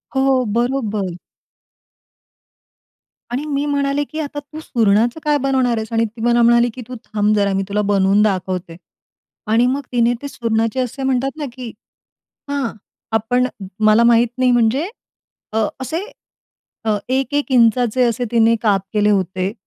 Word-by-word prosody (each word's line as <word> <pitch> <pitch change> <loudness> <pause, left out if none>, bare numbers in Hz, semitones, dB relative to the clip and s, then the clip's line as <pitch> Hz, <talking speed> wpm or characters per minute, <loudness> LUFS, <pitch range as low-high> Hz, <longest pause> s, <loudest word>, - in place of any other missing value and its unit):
हो. 265 -1 +2
बरोबर. 215 -7 -1 2.2
आणि 265 +5 -2
मी 290 -1 -1
म्हणाले, 285 0 0
की 310 +2 -7
आता 290 -1 -4
तू 295 +2 -11
सुरणाचं 230 +2 +1
काय 295 -1 +2
बनवणार 260 -3 +1
आहेस 220 0 -5
आणि 225 0 +2
ती 225 +1 -9
मला 240 0 +3
म्हणाली 235 +1 +4
की, 255 - -8
"तू 255 - -7
थांब 210 0 +1
जरा 200 -1 +1
मी 195 0 0
तुला 210 +1 0
बनवून 195 +1 +3
दाखवते." 185 -4 -1 0.8
आणि 230 +2 +4
मग 270 +3 0
तिने 240 -1 +2
ते 285 - -5
सुरणाचे 230 -2 -1
असे 255 +2 -3
म्हणतात 265 +2 0
ना, 300 - -3
की 250 -2 -7 0.8
हां, 280 -4 -1 0.4
आपण 245 +3 +1 0.4
मला 215 +2 +5
माहित 235 +1 +4
नाही 255 -1 +3
म्हणजे 240 - +2 0.6
अ, - - -1 0.2
असे 315 +5 -3 1.2
एक-एक 280 +2 0
इंचाचे 245 0 +3
असे 245 +1 0
तिने 230 -1 +4
काप 205 -3 +3
केले 210 -1 +2
होते 190 0 0
240 Hz, 145 wpm, -19 LUFS, 215-265 Hz, 2.2 s, मला